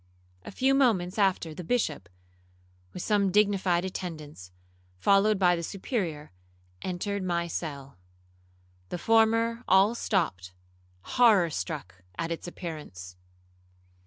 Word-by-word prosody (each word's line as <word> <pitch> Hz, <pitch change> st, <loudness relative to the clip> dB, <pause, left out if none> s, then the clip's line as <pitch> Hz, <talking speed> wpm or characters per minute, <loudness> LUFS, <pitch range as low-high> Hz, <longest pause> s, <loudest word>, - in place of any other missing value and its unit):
A -, -, -8 dB
few 265 Hz, +6 st, +2 dB
moments 215 Hz, -8 st, +2 dB
after 185 Hz, -5 st, +1 dB
the 180 Hz, -, -7 dB
Bishop, 160 Hz, -, -1 dB, 0.8 s
with 180 Hz, -, -6 dB
some 200 Hz, -3 st, +2 dB
dignified 195 Hz, -3 st, +2 dB
attendants, 155 Hz, -, -7 dB, 0.5 s
followed 200 Hz, -, +3 dB
by 180 Hz, -2 st, +4 dB
the 170 Hz, -, -4 dB
Superior, 170 Hz, -, -4 dB, 0.5 s
entered 195 Hz, +2 st, -3 dB
my 170 Hz, -2 st, -1 dB
cell. 140 Hz, -, -6 dB, 0.9 s
The -, -, -3 dB
former 230 Hz, +3 st, +2 dB
all 195 Hz, +4 st, +5 dB
stopped, 155 Hz, -, -1 dB, 0.5 s
horror 205 Hz, -, +4 dB
struck 90 Hz, -3 st, -5 dB, 0.2 s
at 165 Hz, -, -3 dB
its 165 Hz, -, -5 dB
appearance. 150 Hz, -, -8 dB
180 Hz, 110 wpm, -28 LUFS, 155-205 Hz, 0.9 s, all